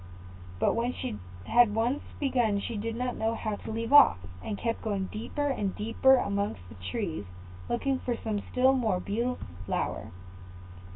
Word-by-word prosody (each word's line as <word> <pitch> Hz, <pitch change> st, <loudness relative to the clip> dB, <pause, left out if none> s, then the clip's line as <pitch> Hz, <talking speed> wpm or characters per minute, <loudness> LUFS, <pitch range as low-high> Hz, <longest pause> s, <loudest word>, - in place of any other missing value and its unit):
But -, -, +2 dB
when 240 Hz, +2 st, 0 dB
she 105 Hz, -, -4 dB, 0.3 s
had 235 Hz, -3 st, +5 dB
once 240 Hz, +5 st, +1 dB, 0.2 s
begun 245 Hz, -7 st, +2 dB
she 230 Hz, +3 st, -4 dB
did 225 Hz, +2 st, -3 dB
not 250 Hz, +1 st, -2 dB
know 225 Hz, +1 st, 0 dB
how 215 Hz, -2 st, -3 dB
to -, -, -7 dB
leave 230 Hz, +4 st, -2 dB
off, 290 Hz, -, +9 dB, 0.3 s
and 205 Hz, -, -3 dB
kept 230 Hz, +1 st, -2 dB
going 200 Hz, -3 st, -2 dB
deeper 260 Hz, +7 st, -3 dB
and 210 Hz, -8 st, -1 dB
deeper 230 Hz, +5 st, +4 dB
amongst 200 Hz, -, -1 dB
the -, -, -11 dB
trees 170 Hz, -, -3 dB, 0.4 s
looking 265 Hz, +2 st, 0 dB
for 240 Hz, -2 st, -2 dB
some 215 Hz, -2 st, -2 dB
still 260 Hz, +1 st, +4 dB
more 225 Hz, -8 st, +1 dB
beautiful 235 Hz, +7 st, -2 dB, 0.2 s
flower. -, -, -2 dB
230 Hz, 165 wpm, -29 LUFS, 205-250 Hz, 0.4 s, off